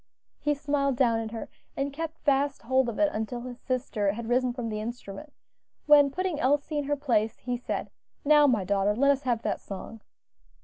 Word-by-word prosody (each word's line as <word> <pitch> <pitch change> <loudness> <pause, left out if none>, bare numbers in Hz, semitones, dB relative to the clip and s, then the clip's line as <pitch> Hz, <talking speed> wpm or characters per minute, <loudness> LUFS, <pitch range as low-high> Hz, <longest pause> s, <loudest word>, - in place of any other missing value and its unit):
He 295 0 +1
smiled 280 -1 0
down 235 -3 +3
at 225 -1 -4
her, 225 0 -6 0.3
and 275 0 -2
kept 320 +2 -5
fast 280 -1 +1
hold 260 +1 +2
of 230 - -5
it 310 -1 +3
until 220 +3 -3
his 245 0 -8
sister 240 -6 -1
had 230 +1 -6
risen 250 0 +2
from 240 -2 -4
the 215 -1 -3
instrument, 235 +4 -7 0.5
when 290 -2 +7
putting 360 +1 -2
Elsie 290 +3 +1
in 290 - -2
her 290 +1 0
place, 230 -6 0
he 245 0 -3
said, 245 - -4 0.3
"Now, 295 0 +6
my 225 -7 +2
daughter, 200 +2 +1
let 280 +4 +4
us 275 -1 0
have 240 -4 -1
that - - -2
song." 205 +3 -8
255 Hz, 195 wpm, -27 LUFS, 225-285 Hz, 0.5 s, when